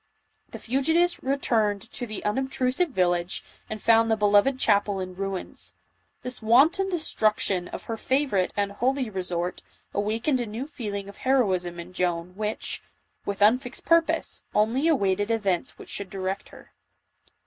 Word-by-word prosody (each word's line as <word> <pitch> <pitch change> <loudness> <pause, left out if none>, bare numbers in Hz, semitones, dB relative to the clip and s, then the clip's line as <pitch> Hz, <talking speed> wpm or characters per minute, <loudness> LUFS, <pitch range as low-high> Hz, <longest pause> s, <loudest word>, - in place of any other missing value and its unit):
The - - -7
fugitives 320 +8 +1
returned 225 -7 +1
to 240 +2 -5
the 215 - -7
unobtrusive 265 +7 0
village 175 -5 0 0.3
and 215 - -4
found 225 +1 +4
the 220 - +3
beloved 210 +5 +4
chapel 205 -4 +2
in 185 -1 -5
ruins. 195 0 -4 0.5
This 250 -1 -3
wanton 285 - +4
destruction 215 - +1
of - - -7
her 225 - -4
favorite 260 -7 +1
and 200 -1 +1
holy 255 +3 0
resort, 180 -2 -2 0.3
awakened 225 +6 0
a 240 - -3
new 225 +5 -4
feeling 205 -8 -5
of 200 - -11
heroism 185 -10 +1
in 175 +2 -9
Joan 180 0 -1
which, 215 +1 -3 0.5
with 200 0 0
unfixed 245 +4 +2
purpose, 335 0 +2
only 235 +8 +2
awaited 205 - +2
events 200 -6 0
which - - -12
should 200 -2 -4
direct 190 0 -4
her. - - -16
215 Hz, 145 wpm, -26 LUFS, 195-260 Hz, 0.5 s, found